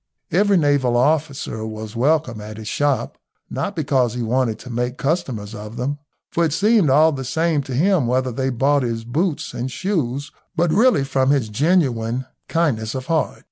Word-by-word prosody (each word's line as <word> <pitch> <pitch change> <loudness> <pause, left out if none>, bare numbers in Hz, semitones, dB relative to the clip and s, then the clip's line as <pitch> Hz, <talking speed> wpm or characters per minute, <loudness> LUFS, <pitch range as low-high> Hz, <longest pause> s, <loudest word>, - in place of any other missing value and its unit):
Every 200 +3 +4
naval 140 -6 +2
officer 140 -4 0
was 110 0 -6
welcome 130 -3 +1
at 105 0 -8
his 110 -1 -8
shop, 145 +2 -1 0.3
not 140 - -3
because 135 -7 +1
he 120 - -2
wanted 115 -1 0
to 125 - -10
make 125 +2 -2
customers 130 - -2
of 105 0 -8
them, 140 +4 -2 0.3
for 170 - +1
it 160 -3 +1
seemed 210 -3 +3
all 155 +4 +5
the 135 -3 -4
same 160 +3 +1
to 130 -2 -5
him 170 -2 +3
whether 130 +1 +1
they 130 +2 -1
bought 140 +3 +2
his 115 -2 -2
boots 155 +7 -1
and 125 +2 -3
shoes, 145 -5 -2 0.2
but 170 -1 +2
really 235 - +4
from 135 -1 +1
his 135 -6 +2
genuine 130 - +1 0.2
kindliness 130 -10 0
of 130 -1 -4
heart. 160 +1 0
135 Hz, 180 wpm, -21 LUFS, 120-155 Hz, 0.3 s, all